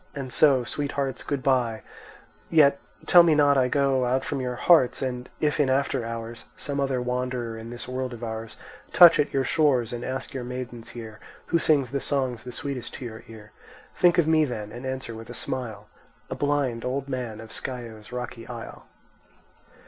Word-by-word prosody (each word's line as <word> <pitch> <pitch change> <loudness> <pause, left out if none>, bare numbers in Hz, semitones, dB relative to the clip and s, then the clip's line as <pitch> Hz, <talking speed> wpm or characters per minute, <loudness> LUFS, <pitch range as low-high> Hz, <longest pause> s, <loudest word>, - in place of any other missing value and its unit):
and 135 -3 -5
so, 135 -5 +5
Sweethearts, 140 0 -3
good 140 -3 -3
bye—yet 135 +4 0 0.3
tell 175 - +8
me 165 -2 +4
not 145 -1 +5
I 130 -2 +3
go 135 -1 +2
Out 130 +2 0
from 140 -2 -2
your 125 -1 -3
hearts; 155 -3 +4
and 125 -1 -4
if 150 0 0
in 140 -3 +3
after 135 -1 +1
hours 115 0 -6
Some 140 -1 -2
other 135 -2 0
wanderer 125 -1 -2
in 115 +1 -8
this 120 0 -7
world 130 0 -3
of 120 -1 -8
ours 110 -1 -6 0.4
Touch 175 -3 +8
at 145 - +2
your 135 - +1
shores, 130 -5 +2
and 120 0 -5
ask 130 0 -4
your 130 -2 -4
maidens 125 -2 -6
here 110 -2 -9 0.3
Who 170 - +3
sings 140 -7 +2
the 140 - -1
songs 130 -5 -1
the 125 - -6
sweetest 135 -3 -5
to 130 - -7
your 110 -2 -8
ear, 110 -1 -12 0.4
Think 175 -1 +4
of 170 - +4
me 160 0 +4
then, 110 -7 -4
and 120 +4 -7
answer 130 -3 -4
with 115 +1 -10
a 120 - -7
smile, 125 -5 -5 0.4
'A - - -2
blind 145 -5 0
old 135 +2 -2
man 125 -5 -4
of 110 0 -10
Scio's 115 -4 -6
rocky 125 -2 -6
isle. 120 -2 -9
125 Hz, 185 wpm, -26 LUFS, 120-140 Hz, 0.4 s, tell